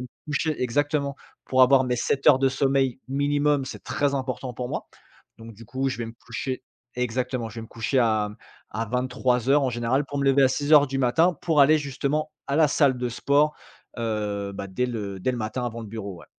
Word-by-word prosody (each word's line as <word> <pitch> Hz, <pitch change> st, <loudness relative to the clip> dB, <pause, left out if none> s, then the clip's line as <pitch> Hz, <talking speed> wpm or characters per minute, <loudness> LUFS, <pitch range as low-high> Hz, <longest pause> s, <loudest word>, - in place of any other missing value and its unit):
me 125 Hz, -, -6 dB, 0.2 s
coucher 150 Hz, -1 st, -1 dB
exactement, 140 Hz, +2 st, 0 dB, 0.3 s
pour 130 Hz, 0 st, +1 dB
avoir 130 Hz, +1 st, +6 dB
mes 125 Hz, -1 st, -1 dB
7 135 Hz, +3 st, -1 dB
heures 145 Hz, -3 st, +7 dB
de 135 Hz, 0 st, +3 dB
sommeil 135 Hz, -1 st, +1 dB
minimum, 145 Hz, 0 st, +1 dB
c'est -, -, -8 dB
très 140 Hz, -1 st, 0 dB
important 130 Hz, -1 st, -4 dB
pour 125 Hz, +1 st, -5 dB
moi, -, -, -4 dB, 0.5 s
donc 115 Hz, 0 st, -11 dB
du 115 Hz, +3 st, -13 dB
coup 130 Hz, +3 st, -2 dB
je 135 Hz, -, -3 dB
vais 120 Hz, -, -2 dB
me 115 Hz, -, -8 dB
coucher 130 Hz, +2 st, -4 dB, 0.3 s
exactement, 125 Hz, 0 st, -2 dB
je 110 Hz, -, -12 dB
vais 115 Hz, -, -5 dB
me -, -, -9 dB
coucher 115 Hz, +4 st, -1 dB
à 110 Hz, -3 st, +2 dB, 0.4 s
à 110 Hz, +3 st, -2 dB
23:00 125 Hz, +3 st, +1 dB
en 130 Hz, -, +1 dB
général, 120 Hz, +4 st, 0 dB
pour 145 Hz, +1 st, -5 dB
me 140 Hz, -, 0 dB
lever 135 Hz, 0 st, +4 dB
à 130 Hz, -, +6 dB
06:00 145 Hz, +2 st, +4 dB
du 135 Hz, 0 st, -3 dB
matin 160 Hz, +8 st, +3 dB
pour 160 Hz, -4 st, +2 dB
aller 155 Hz, +3 st, +5 dB
justement 140 Hz, +2 st, -2 dB, 0.2 s
à 140 Hz, +1 st, -1 dB
la 155 Hz, -2 st, +5 dB
salle 140 Hz, -3 st, +2 dB
de 125 Hz, 0 st, -1 dB
sport, 145 Hz, +5 st, +2 dB, 0.4 s
heu, 105 Hz, -3 st, -2 dB
bah 100 Hz, -, -5 dB
dès 110 Hz, +7 st, -1 dB
le 105 Hz, -5 st, -5 dB
dés 130 Hz, -, 0 dB
le 125 Hz, -, -4 dB
matin 110 Hz, +3 st, -3 dB
avant 115 Hz, -1 st, -4 dB
le 115 Hz, -, -7 dB
bureau 100 Hz, -3 st, -6 dB
ouais. -, -, -14 dB
130 Hz, 215 wpm, -25 LUFS, 115-140 Hz, 0.5 s, heures